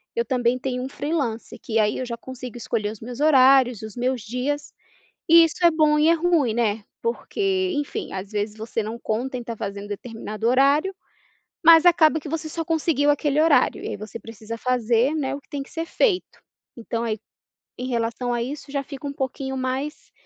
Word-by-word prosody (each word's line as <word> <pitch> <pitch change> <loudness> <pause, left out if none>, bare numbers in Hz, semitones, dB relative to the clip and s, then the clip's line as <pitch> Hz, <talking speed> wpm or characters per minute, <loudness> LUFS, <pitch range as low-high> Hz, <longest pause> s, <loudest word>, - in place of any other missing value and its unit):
eu 470 - 0
também 250 -1 +1
tenho 250 0 -3
um 260 - -4
freelance, 265 -7 -3
que 225 - -3
aí 210 -1 +2
eu 255 - -2
já 235 -1 -5
consigo 250 -1 -8
escolher 215 -3 -2
os 215 - -10
meus 240 +2 -7
horários, 265 -5 +5
os 220 -2 -8
meus 250 0 -1
dias. 250 +7 -3 0.6
E 335 0 +9
isso 330 +2 0
é 340 - +7
bom 305 -1 +3
e 305 +2 +4
é - - +6
ruim, 330 -8 +2
né, 220 -2 0 0.2
porque 375 - -1
enfim, 290 0 -3
às 195 +2 -6
vezes, 210 +1 -3
você 220 0 -3
não 225 +2 -5
conta 245 +4 -2
em - - -5
estar 235 -1 -6
fazendo 200 0 -5
determinado 220 +1 -5
horário, 280 +9 +3 0.7
mas 330 +1 +8
acaba 320 -2 +5
que 300 - -8
você 315 +1 -3
só 330 +2 -4
conseguiu 315 -3 +1
aquele 290 0 +1
horário 305 -5 +3
e - - -3
aí - - -4
você 215 +3 -8
precisa 225 +1 -8
fazer, 245 +2 +1
né, 280 -3 -1
o 285 - -6
que - - -34
tem 280 -1 -4
que - - -13
ser 330 0 -4
feito. 385 -1 0 0.4
Então, 230 0 -3
aí, 220 -2 -2 0.6
em 250 - -4
relação 235 0 -1
a 235 - -1
isso, 280 +3 -6
já 280 0 -1
fica 280 0 -7
pouquinho 265 0 -3
mais, 260 +4 -4
255 Hz, 200 wpm, -23 LUFS, 230-300 Hz, 0.7 s, E